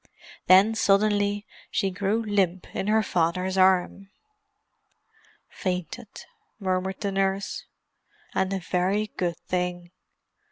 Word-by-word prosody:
Then, 195 +4 +7
suddenly, 205 -1 +2 0.2
she 195 - 0
grew 205 +4 0
limp 190 -3 0
in 195 - -2
her 220 +1 +3
father's 180 +1 0
arm. 190 +1 +2 1.4
"Fainted," 185 +4 -5 0.3
murmured 190 -1 -2
the 200 -2 -1
nurse. 195 0 -1 0.7
"And 190 0 0
a 195 - 0
very 190 +4 0
good 175 -2 -1
thing." 180 -1 -3
190 Hz, 105 wpm, -26 LUFS, 185-205 Hz, 1.4 s, Then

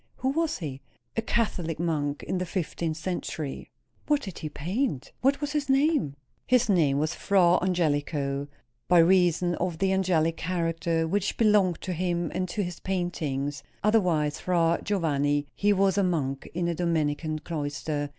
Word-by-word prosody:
"Who 260 - -1
was 320 +3 0
he?" 140 -6 -6 0.3
"A 225 - +1
Catholic 180 -8 -1
monk, 150 -4 -1
in 185 - -2
the 180 - -1
fifteenth 165 -3 -2
century." 160 -4 -4 0.4
"What 295 -1 +2
did 190 -4 -7
he 155 - -4
paint? 170 - -2
What 275 +2 +3
was 290 0 -2
his 295 -2 -2
name?" 270 - +2 0.3
"His 250 -2 +3
name 155 -8 +3
was 155 +3 0
Fra 180 -3 +3
Angelico 145 -5 0 0.4
by 180 - +5
reason 175 0 +4
of 175 -2 -2
the 190 +2 +1
angelic 170 -4 +1
character 165 -1 -1
which 200 +3 -1
belonged 205 -6 +3
to 185 - -3
him 175 0 -1
and 185 -1 -2
to 205 +3 -1
his 175 -1 -5
paintings; 150 -7 -2 0.2
otherwise 175 -9 +2
Fra 170 -2 +2
Giovanni; 145 -7 +1
he 205 +1 +2
was 195 -1 +3
a - - +3
monk 140 -7 -1
in 170 +1 -1
a 170 - 0
Dominican 155 -2 0
cloister. 145 -2 -3
170 Hz, 160 wpm, -27 LUFS, 155-190 Hz, 0.4 s, by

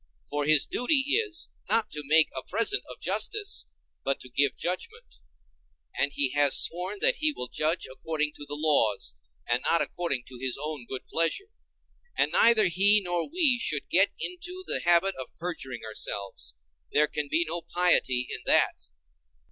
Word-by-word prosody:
For 145 0 -1
his 155 -1 +5
duty 270 +2 +1
is, 420 -7 0 0.2
not 225 -2 +1
to 150 - -4
make 155 +3 +5
a 130 - -3
present 230 - 0
of - - -10
justice, 425 -2 -1 0.4
but 135 0 -1
to 130 - -11
give 140 +1 0
judgment; 175 - -5 0.8
and 140 - 0
he 140 -1 +1
has 145 0 +5
sworn 180 +4 +1
that - - +4
he 310 0 +3
will 125 - -6
judge 155 +3 -1
according 150 +3 -3
to 145 - -9
the 145 - -4
laws, 145 - +1 0.3
and 120 +1 +1
not 165 +2 +2
according 155 -8 -2
to 125 -1 -11
his 130 -1 -1
own 150 -4 -6
good 130 - -6
pleasure; 275 - -1 0.7
and - - +2
neither 230 -2 +4
he 195 +4 +4
nor 175 +2 -1
we 295 -7 +3
should 150 -10 -2
get 190 +3 +5
into 360 +1 -5
the - - +1
habit 175 +3 +3
of 130 - -11
perjuring 135 -9 -5
ourselves—there 60 - -4
can 150 -1 -4
be 165 +3 +2
no 170 +2 -1
piety 130 -9 +2
in - - -6
that. 70 - +2
155 Hz, 165 wpm, -27 LUFS, 130-205 Hz, 0.8 s, his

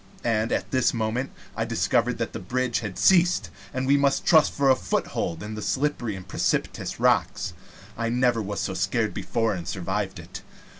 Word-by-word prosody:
And 115 -1 +1
at - - -1
this 130 -2 +2
moment 115 +4 -1 0.3
I - - 0
discovered - - +1
that - - -3
the - - -4
bridge 120 +5 -1
had 105 -5 -6
ceased, 175 - +4 0.2
and 130 0 -2
we 140 +2 +4
must 140 -1 +2
trust 160 -2 +5
for 140 -1 +3
a - - +6
foothold 85 -8 -2
to 105 - -6
the 110 0 -5
slippery 130 -5 -1
and 95 -1 -9
precipitous - - -1
rocks. - - +1 0.4
I 115 0 -1
never 120 -1 +2
was 100 -1 -3
so 95 - -2
scared 100 +4 0
before 115 -2 -1
and 85 -3 -6
survived 95 +1 -2
it. 90 +2 -9
115 Hz, 185 wpm, -25 LUFS, 100-130 Hz, 0.4 s, a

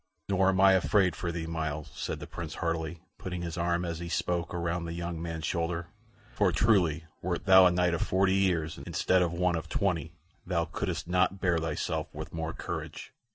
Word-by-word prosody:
"Nor 95 -1 +3
am 95 -1 +1
I 95 0 +7
afraid 95 -1 +3
for 85 - -3
thee, 85 -1 -4
Myles," 80 -2 -3
said - - -4
the - - -6
Prince, 80 -2 -6
heartily, 85 -1 -2 0.2
putting 90 -1 -4
his 85 -2 -4
arm, 85 +1 0
as 85 -1 -3
he 85 0 -5
spoke, 85 0 -1
around 85 0 -2
the 85 - -4
young 85 -1 -4
man's 80 -2 -4
shoulder; 85 0 -2 0.4
"for - - +3
truly, 85 -8 +3 0.2
wert 90 +1 -2
thou 95 -1 +8
a - - +3
knight 90 0 +2
of 85 - -1
forty 95 0 +2
years, 90 -5 +1
instead 95 0 +1
of 85 -2 +1
one 90 0 +1
of 80 - -4
twenty, 85 -5 -1 0.3
thou 85 -2 0
couldst 85 -1 -3
not 90 +2 +2
bear 90 -3 +2
thyself 80 -1 -2
with - - -7
more 80 0 -3
courage." - - -6
85 Hz, 200 wpm, -29 LUFS, 85-90 Hz, 0.4 s, thou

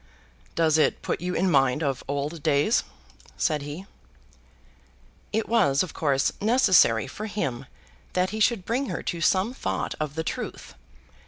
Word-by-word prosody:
"Does 160 -1 +3
it - - +1
put - - -2
you 180 +1 -2
in 185 +1 +2
mind 135 +1 +3
of 135 -3 -1
old 145 +3 -3
days?" 150 +7 +2 0.5
said 150 -2 0
he. 145 +6 -7 1.5
It 220 +1 -1
was, 190 -12 +3
of 185 - -7
course, 140 -3 +1
necessary 190 - +4
for 215 - -6
him 140 - -3 0.5
that 185 0 +1
he 220 - -4
should 215 -4 +2
bring 255 +4 -1
her - - -4
to 170 -2 -3
some 190 +8 +2
thought 95 - -3
of 150 -2 -3
the 160 - -2
truth. - - -5
165 Hz, 155 wpm, -25 LUFS, 140-205 Hz, 1.5 s, necessary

